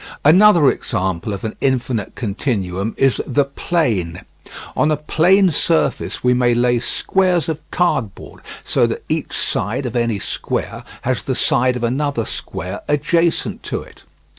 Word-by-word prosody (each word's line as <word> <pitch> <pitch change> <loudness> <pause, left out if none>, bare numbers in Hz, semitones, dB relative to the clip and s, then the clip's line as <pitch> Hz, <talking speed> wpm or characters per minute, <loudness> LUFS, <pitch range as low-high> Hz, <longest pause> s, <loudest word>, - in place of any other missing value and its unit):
Another 175 -1 +6
example 95 -3 -3
of 100 -1 -5
an 110 - -4
infinite 130 -5 -1
continuum 100 -3 -2
is 135 -2 +2
the 140 +2 +2
plane. 115 - -1 0.5
On 150 - +2
a 155 - +1
plane 180 +5 +3
surface 160 +2 0
we 125 0 +4
may 125 -1 +2
lay 120 0 +2
squares 180 +7 0
of 160 -2 -2
cardboard 135 - -2 0.2
so - - +2
that - - -4
each - - -2
side 115 +8 -2
of 125 0 -4
any 115 -3 +1
square - - -3 0.2
has - - -1
the - - -1
side 125 0 +2
of 125 - -4
another 130 0 0
square 95 +1 -6
adjacent 165 +3 +1
to - - -4
it. - - -18
125 Hz, 145 wpm, -19 LUFS, 110-155 Hz, 0.5 s, Another